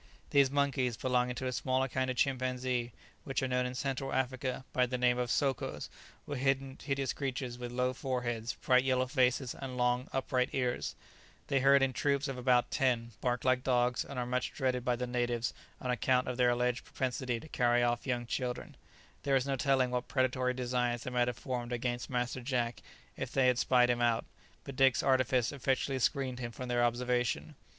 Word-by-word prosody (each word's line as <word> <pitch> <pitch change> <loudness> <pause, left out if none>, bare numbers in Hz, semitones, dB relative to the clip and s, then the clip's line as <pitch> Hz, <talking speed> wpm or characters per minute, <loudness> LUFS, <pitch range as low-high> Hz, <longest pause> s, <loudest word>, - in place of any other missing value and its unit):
These 140 -2 +5
monkeys, 135 -4 +1
belonging 125 -1 +1
to 130 - -4
a 130 - 0
smaller 130 +1 0
kind 130 0 -1
of 130 - -3
chimpanzee, 130 -2 0 0.3
which 135 -1 -2
are - - +1
known 125 0 +1
in 125 - -6
Central 135 0 -2
Africa 130 0 -2
by 125 -1 +3
the 125 +1 -2
name 125 0 +2
of 125 -1 -1
sokos, 135 0 -1 0.4
were 145 - -4
hideous 135 +1 -1
creatures 130 -3 -4
with 120 -1 -5
low 125 +1 0
foreheads, 120 -3 -2
bright 125 0 +5
yellow 130 -1 +2
faces, 130 -1 +1
and 130 -2 -7
long, 125 +1 +1
upright 130 -1 0
ears; 125 -2 -1 0.5
they 135 - +3
herd 140 +1 +5
in 135 -1 +1
troops 140 +1 +1
of 135 - -3
about 125 -1 +2
ten, 120 -4 +1
bark 125 -1 -1
like 130 -1 +3
dogs, 125 -1 +2
and 140 - -8
are 125 - -1
much 125 0 -1
dreaded 125 -2 0
by 125 -1 +1
the 125 +1 -3
natives 120 -1 -1 0.3
on 125 - -2
account 125 +1 +2
of 125 - -2
their 125 0 +3
alleged 125 0 0
propensity 125 -2 -2
to 155 - -12
carry 120 -4 +2
off 120 +2 0
young 120 -2 -1
children; 125 +1 -3 0.5
there 140 -1 +1
is 130 -1 +2
no 140 -1 0
telling 130 -1 +2
what 125 0 -2
predatory 130 -1 +1
designs 125 -1 -1
they 125 - -5
might 125 -1 +2
have 125 -3 -2
formed 125 -2 -4
against 120 0 -2
Master 125 0 -2
Jack 120 -2 -1 0.3
if - - -5
they 135 -1 +3
had 125 -1 +3
spied 125 -1 +4
him 120 0 -1
out, 120 -1 +2 0.4
but 140 - -8
Dick's 135 -1 +4
artifice 130 -2 +2
effectually 135 -1 0
screened 130 0 0
him 120 -2 -4
from 125 +2 -7
their 120 0 +2
observation. 120 +4 0
125 Hz, 195 wpm, -32 LUFS, 125-130 Hz, 0.5 s, These